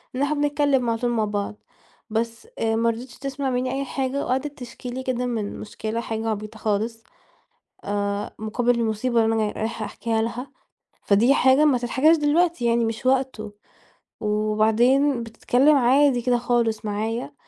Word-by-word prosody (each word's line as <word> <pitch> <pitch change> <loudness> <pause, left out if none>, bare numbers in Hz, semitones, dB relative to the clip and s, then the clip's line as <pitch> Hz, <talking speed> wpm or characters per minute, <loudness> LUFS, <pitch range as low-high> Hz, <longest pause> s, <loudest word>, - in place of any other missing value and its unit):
إن 260 - -2
إحنا 285 +2 +1
بنتكلّم 290 -4 +1
على 225 0 -1
طول 245 - 0
مع 225 -2 +1
بعض، 205 0 -3 0.5
بس 230 - -3
آآ 225 0 +1
ما 230 +1 +2
رضيتش 240 +2 -6
تسمع 275 0 -3
منّي 255 0 -1
أي 275 +1 -2
حاجة 270 +1 -2
وقعدت 270 +3 -2
تشكي 245 0 -8
لي 255 +2 -5
كده 250 -1 -1
من 225 -4 -3
مشكلة 220 +2 -4
حاجة 225 -1 -3
عبيطة 215 +1 -5
خالص 220 +2 -2 0.8
آآ 200 0 -2
مقابل 235 +3 0
المصيبة 230 +1 +1
اللي 225 0 +1
أنا 215 -1 0
رايحة 220 0 -4
أحكيها 225 +2 -2
لها، 245 +4 -4 0.6
فدي 225 +7 +4
حاجة 265 +2 +5
ما 280 -5 +4
تتحكاش 265 +7 +3
دلوقتي 320 0 +1
يعني 235 0 +2
مش 225 +2 -3
وقته، 255 -5 0 0.7
وبعدين 220 +6 +2
بتتكلّم 245 +5 +2
عادي 265 0 +4
كده 245 0 +2
خالص 235 -2 0
معايا، 220 +3 -3
235 Hz, 160 wpm, -23 LUFS, 220-260 Hz, 0.8 s, حاجة